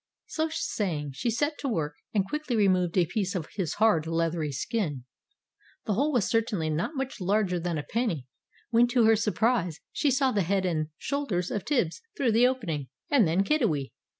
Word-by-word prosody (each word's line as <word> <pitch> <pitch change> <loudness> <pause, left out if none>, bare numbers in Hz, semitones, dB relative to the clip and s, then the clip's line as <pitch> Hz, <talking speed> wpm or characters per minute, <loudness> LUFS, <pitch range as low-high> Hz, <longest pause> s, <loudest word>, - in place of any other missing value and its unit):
So 315 0 -1
saying, 160 - -2
she 135 - -2
set 290 +7 -1
to 280 - -3
work, 155 - -1 0.2
and 195 -3 +1
quickly 300 -1 -2
removed 185 -4 +2
a 180 - +5
piece 190 +2 -2
of 165 -4 -3
his 185 -7 -2
hard, 190 -8 +3
leathery 165 -2 0
skin. 150 - -2 0.8
The 215 - 0
hole 280 +9 +1
was 240 -8 +2
certainly 215 -9 0
not 170 - -2
much 265 -5 -4
larger 190 -1 +1
than 170 -1 -2
a 150 - -3
penny, 210 - -1 0.5
when 235 +1 +5
to 245 -2 +3
her 225 0 +6
surprise 215 -5 +1
she 295 - +1
saw 265 0 +2
the 205 - +1
head 190 +2 +1
and 155 -4 0
shoulders 225 -12 -2
of 205 - -3
Tibbs 240 - 0 0.2
through 255 -4 +2
the 235 +3 +5
opening, 170 - -2 0.2
and 250 - +5
then 175 +5 +2
Kiddiwee. 200 - +1
200 Hz, 185 wpm, -28 LUFS, 165-240 Hz, 0.8 s, her